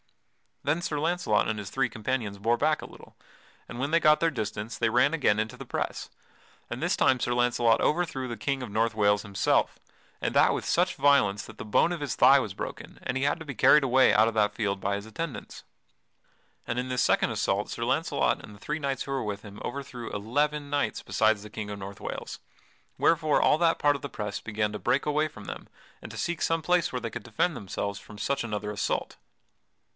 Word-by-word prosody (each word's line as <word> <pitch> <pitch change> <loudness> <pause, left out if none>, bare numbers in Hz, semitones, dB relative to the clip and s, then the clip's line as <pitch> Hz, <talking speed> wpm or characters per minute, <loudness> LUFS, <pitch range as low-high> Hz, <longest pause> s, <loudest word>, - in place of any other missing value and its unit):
Then 150 +5 0
Sir 150 -4 -2
Launcelot 160 -9 +1
and 110 - -1
his 100 - -6
three 135 -2 +1
companions 110 -2 -3
bore 115 +4 +1
back 155 +4 +1
a - - -7
little, - - -15 0.5
and 120 - -7
when 140 +2 -1
they 165 - +5
got 155 -2 +5
their 165 -1 +2
distance 110 -2 -4
they 115 - +2
ran 125 +6 +3
again 120 -10 +2
into 110 0 -3
the - - -8
press, - - -3 0.6
and - - -4
this - - +1
time 130 -1 +3
Sir 120 - 0
Launcelot 120 -2 +3
overthrew 150 -6 0
the 120 -2 -5
King 135 +4 -2
of 120 - -7
North 110 +1 +1
Wales 105 -1 +3
himself, 100 -3 +1 0.4
and - - -2
that - - +5
with - - -4
such - - +1
violence 130 -9 +3
that 110 - -12
the - - -6
bone 110 +10 +3
of 175 - -3
his 145 -6 -2
thigh - - +7
was - - -4
broken, - - -7
and 125 - -2
he 135 - -1
had 145 +4 +1
to 160 - -8
be 135 -3 -6
carried 150 -1 +6
away 130 0 +5
out 110 +1 +5
of 115 - -2
that 105 -1 +2
field 100 -3 -1
by 100 +1 -1
his 100 +1 -6
attendants. 150 +5 -6 1.0
And 120 - -2
in 125 +1 -3
this 125 -1 0
second - - +3
assault - - 0
Sir - - -4
Launcelot - - 0
and 105 - -11
the - - -16
three 150 +8 -3
knights 135 -3 -2
who 135 - -7
were 135 -1 -1
with 105 -1 -4
him 105 -1 -10
overthrew 130 -4 -6
eleven 145 +8 -1
knights 145 0 -1
besides 110 -1 +2
the 105 - -10
King 105 0 -6
of 100 - -6
North 95 0 -8
Wales, - - -6 0.6
wherefore 155 -2 +3
all 150 - +4
that 165 -1 +3
part 145 0 +3
of 140 - -6
the 140 - -4
press 105 -3 -4
began 105 -1 -2
to 105 - -4
break 130 +4 +1
away 150 +1 +2
from 105 -8 -12
them - - -7 0.4
and - - -8
to - - -9
seek 175 -1 -2
some 165 -1 +1
place 180 +1 +2
where 125 - -2
they 115 -1 -4
could 125 - -6
defend 120 +10 0
themselves 100 0 -4
from 105 - -13
such 135 +7 -1
another 105 -2 -3
assault. 105 0 -2
120 Hz, 225 wpm, -27 LUFS, 105-145 Hz, 1.0 s, thigh